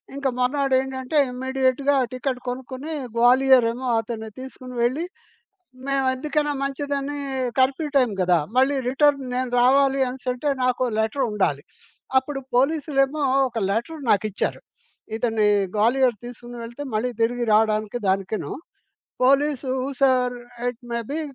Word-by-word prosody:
ఇంక 280 -1 -1
మర్నాడేంటంటే 265 +1 0
ఇమ్మీడియేట్‌గా 260 +2 +1 0.2
టికెట్ 255 0 -2
కొనుక్కొని 260 +4 -5 0.2
గ్వాలియరేమో 250 0 +4
అతన్ని 220 -1 -5
తీసుకొని 255 -1 -9
వెళ్ళి, 265 +8 0 0.8
మేము 275 -1 +1
ఎందుకైనా 295 +2 -1
మంచిదని 280 +1 -3 0.4
కర్ఫ్యూ 270 +4 +2
టైం 250 -4 +3
గదా! 180 -1 +3 0.2
మళ్ళీ 265 +2 +4
రిటర్న్ 280 +1 +3
నేను 255 0 -1
రావాలి 275 +2 +4
అనెసంటే 255 +2 -2
నాకో 255 0 +1
లెటరుండాలి. 220 -1 0 0.6
అప్పుడు 270 +1 -6 0.2
పోలీసులేమో 285 +1 +1 0.3
ఒక 235 - -7
లెటర్ 235 +9 -3
నాకి‌చ్చారు. 210 0 0 0.5
ఇతని 225 -2 +1 0.3
గ్వాలియర్ 240 +3 +3
తీసుకుని 240 0 -9
వెళితే 235 +5 -7
మళ్ళీ 220 +4 0
తిరిగి 240 +2 +1
రాడానికి 215 +1 +2
దానికిను. 195 +2 -1 0.7
Police 275 0 +2 0.3
sir 255 -2 +3 0.3
it 245 -2 -2
maybe 235 +7 -3
255 Hz, 110 wpm, -23 LUFS, 240-275 Hz, 0.8 s, గ్వాలియరేమో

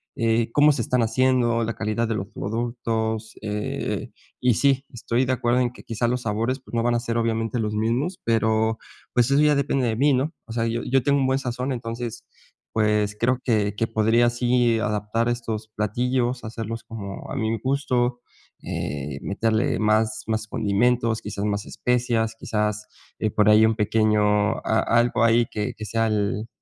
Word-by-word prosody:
eh, 115 0 +1
cómo 150 +4 +5
se 125 - -2
están 125 +2 +1
haciendo 120 0 +2
la 115 0 -2
calidad 110 +2 -1
de 115 - -1
los 100 -2 -3
productos, 110 0 -3
eh, 105 0 -3 0.3
y 125 -1 +4
sí, 140 +1 +2
estoy 120 +1 -1
de 130 - 0
acuerdo 120 0 +1
en 120 - 0
que - - -14
quizás 115 +1 -1
los 125 0 -1
sabores, 115 +5 -1
pues, 130 - -17
no 115 - +1
van 120 0 +2
a 120 - +2
ser 115 0 -2
obviamente 115 +1 0
los 105 -1 -1
mismos, 120 - -1
pero, 110 0 +2 0.4
pues 120 +1 +3
eso 140 +2 +4
ya 150 -1 +4
depende 135 -2 +1
de 110 - 0
mí, 140 +5 +3
¿no? 135 +6 0
O 115 - -11
sea, 115 -1 0
yo 115 +1 -1
yo 135 +1 +2
tengo 140 +1 +3
un 135 - +2
buen 130 +1 +1
sazón. 125 0 -3
Entonces, 115 -1 -5 0.5
pues 105 -1 +1
creo 125 +2 +2
que 105 -4 +1
que 115 +2 0
podría 115 +2 +3
así 120 -1 +2
adaptar 105 +2 -1
estos 115 -2 -3
platillos, 120 +4 0
hacerlos 115 0 -5
como 100 -4 -8
a - - -4
mi 110 -2 0
gusto, 125 -2 0 0.4
eh, 70 -1 -4
meterle 110 +3 0
más 110 0 +1
más 110 0 -1
condimentos, 115 +2 +1
quizás 100 0 -4
más 100 -1 -1
especias, 120 -2 0
quizás, 105 -1 -2 0.3
eh, 110 - 0
por 105 0 +3
ahí 110 +1 +7
un 110 0 +2
pequeño, 105 0 +2 0.4
a 110 - +2
algo 120 0 +2
ahí 115 +1 +4
que 105 -1 -2
que 110 - -7
sea 115 +2 0
el, 105 +1 -1
115 Hz, 185 wpm, -24 LUFS, 110-120 Hz, 0.5 s, ahí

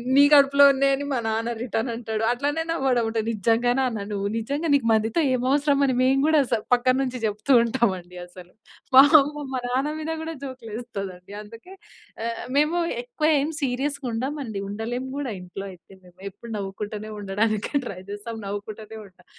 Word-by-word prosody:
"నీ 285 - +8
కడుపులో 280 0 +6
ఉన్నాయని" 275 +1 +1
మా 255 - 0
నాన్న 225 +2 -1
రిటర్న్ 235 0 -2
అంటాడు 225 -2 -3
అట్లనే 290 +6 -1
నవ్వడం 255 -7 +1 0.2
నిజంగా 230 +3 +2
నాన్న 225 -6 -2
నువ్వు 200 0 -2
నిజంగా 280 +8 -2
నీకు 260 -5 +1
మందితో 220 +8 +1
ఏమి 250 0 -1
అవసరం 285 0 +2
అని 255 - +1
మేము 265 +1 +3
కూడా 315 -2 +5
స - - +5 0.2
పక్కన 255 +1 +2
నుంచి 255 -1 -4
చెప్తూ 210 +6 -2
ఉంటాం 230 -2 +1
అండి 180 +1 -12
అసలు. 180 0 -14 0.5
మా 270 - +12 0.2
అమ్మ 295 +1 -5
మా 255 - -2
నాన్న 275 +5 -1
మీద 315 +1 -4
కూడా 325 0 -5
జోక్‌లు 255 -4 -9
వేస్తది 210 -5 -5
అండి. 185 +3 -14
అందుకే 230 - -13 0.5
ఆహ్, 230 0 -4
మేము 300 +4 +2 0.3
ఎక్కువ 475 -11 -1
ఏమి 300 +4 -2
సీరియస్‌గా 265 +1 0 0.2
ఉండం 260 +6 -2
అండి. 220 -5 -5
ఉండలేము 230 +5 -4
కూడా, 285 -3 -3
ఇంట్లో 180 +2 -8
అయితే 180 0 -17
మేము 180 0 -20
ఎప్పుడు 230 +4 -12
నవ్వుకుంటూనే 205 +2 -5
ఉండడానికి 205 +2 -1
ట్రై 185 -5 -6
చేస్తాం 225 +2 -6
నవ్వుకుంటూనే 210 +2 -7
ఉంటాం. 180 -2 -20
235 Hz, 175 wpm, -24 LUFS, 210-275 Hz, 0.5 s, మా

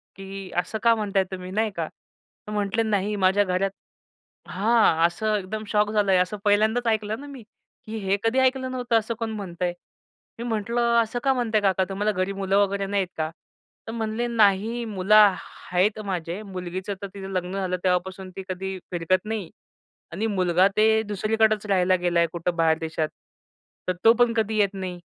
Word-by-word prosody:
की 195 0 -8
"असं 215 +5 -1
का 230 -1 +6
म्हणताय 200 -3 +1
तुम्ही?" 185 0 -6
नाही 215 +2 0
का, 165 -2 -2
तर 210 - -17
म्हटले, 210 +2 0
"नाही 210 -1 0
माझ्या 195 +1 +3
घरात" 190 0 0 0.8
हां. 195 -5 +3
असं 215 +5 -1
एकदम 210 +2 -5
शॉक 210 0 +1
झालंय, 200 -3 +3
असं 180 +3 0
पहिल्यांदाच 220 +4 +3
ऐकलं 220 0 0
ना 290 - -9
मी, 275 -3 -9 0.4
की 220 +1 -5
हे 195 +1 +2
कधी 225 +3 +2
ऐकलं 260 0 +1
नव्हतं 245 -3 +1
असं 220 +2 -4
कोण 225 -1 -2
म्हणतंय. 180 -4 -3 0.7
मी - - -4
म्हटलं, 235 +2 +1
"असं 235 +2 -4
का 270 - +3
म्हणताय 230 -4 +1
काका? 190 -1 +2
तुम्हाला 205 +2 0
घरी 185 0 -1
मुलं 195 0 0
वगैरे 200 -1 +1
नाहीत 195 -1 0
का?" 155 0 -1 0.6
तर - - -4
म्हणले, 225 +1 -2
"नाही 225 +1 +2
मुलं 205 -1 +2
ह 205 -3 +7 0.4
आहेत 195 +4 +2
माझे, 180 0 -3
मुलगीचं 185 0 -5
तर 200 - -4
तिचं 195 -1 -7
लग्न 180 -1 -2
झालं, 185 -2 -1
तेव्हापासून 185 +1 -1
ती 195 - -5
कधी 190 +1 -4
फिरकत 180 +3 0
नाही. 215 -5 -4 0.6
आणि 200 +7 -2
मुलगा 185 -2 +3
ते 220 +1 +4
दुसरीकडेच 215 +1 +1
राहायला 185 -2 +3
गेला 175 -1 +2
आहे 170 - +3
कुठं 170 0 -2
बाहेर 165 -1 +3
देशात. 160 -1 -2 0.8
तर 185 - +2
तो 225 - +9
पण 240 -1 +4
कधी 220 -1 0
येत 205 -1 +2
नाही 185 -2 -5
200 Hz, 180 wpm, -25 LUFS, 185-220 Hz, 0.8 s, तो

